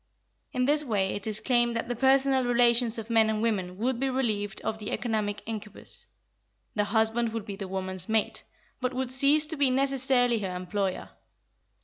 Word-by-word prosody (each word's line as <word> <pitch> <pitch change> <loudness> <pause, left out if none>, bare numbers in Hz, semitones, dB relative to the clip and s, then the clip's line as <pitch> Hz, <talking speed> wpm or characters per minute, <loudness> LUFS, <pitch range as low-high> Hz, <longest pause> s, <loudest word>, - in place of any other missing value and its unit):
In 250 0 0
this 295 +2 +2
way 205 -7 0
it 205 +1 -6
is 215 -1 -2
claimed 240 -2 +2
that 230 - -2
the 245 - -2
personal 265 +1 +3
relations 240 -1 +3
of 225 +1 -6
men 225 -1 +4
and 215 -1 0
women 190 -5 -1
would 240 +3 -1
be 270 +1 0
relieved 215 -6 -1
of 220 - -3
the 210 - -5
economic 210 -3 -2
incubus: 215 -2 -7 0.7
the 210 -1 +1
husband 220 +2 +1
would 225 -3 -4
be 205 -3 -6
the 195 -1 -6
woman's 185 0 -2
mate, 220 -1 0 0.4
but 255 0 -2
would 260 -1 -2
cease 280 +3 +3
to 320 +1 -3
be 280 -3 +3
necessarily 260 -3 +2
her 190 -3 -4
employer. 185 +1 -3
230 Hz, 180 wpm, -28 LUFS, 205-255 Hz, 0.7 s, men